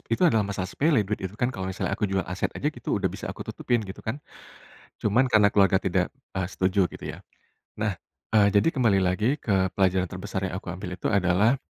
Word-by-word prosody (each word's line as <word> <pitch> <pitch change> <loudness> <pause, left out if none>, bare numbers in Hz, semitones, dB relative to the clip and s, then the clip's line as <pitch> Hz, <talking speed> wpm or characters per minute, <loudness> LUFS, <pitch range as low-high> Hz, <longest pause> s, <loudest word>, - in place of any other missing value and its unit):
itu 115 +10 +2
adalah 115 -10 +4
masalah 100 -2 -2
sepele 140 - +2
duit 105 +2 -3
itu 95 +2 -5
kan 120 +3 0
kalau 95 -3 -4
misalnya 95 +1 -3
aku 105 0 0
jual 95 -1 0
aset 90 +1 -2
aja - - -1
gitu - - -2
udah - - 0
bisa - - -6
aku - - -6
tutupin 120 -3 -1
gitu 95 - -8
kan. 115 +5 -3 0.9
Cuman 120 +6 +3
karena 105 -4 +4
keluarga 95 -2 +4
tidak, 95 +3 0 0.2
eee, 95 -1 -2
setuju 95 0 +1
gitu - - -12
ya. - - -10 0.6
Nah, 105 -4 -2 0.3
eee, 105 -2 +5
jadi 100 +9 +4
kembali 115 -10 +2
lagi 105 +8 +2
ke 95 -3 +2
pelajaran 95 -1 +2
terbesar 95 +1 -4
yang 90 - -5
aku - - -6
ambil 90 0 -5
itu 90 - -2
adalah, 100 +6 +3
100 Hz, 210 wpm, -26 LUFS, 95-110 Hz, 0.9 s, eee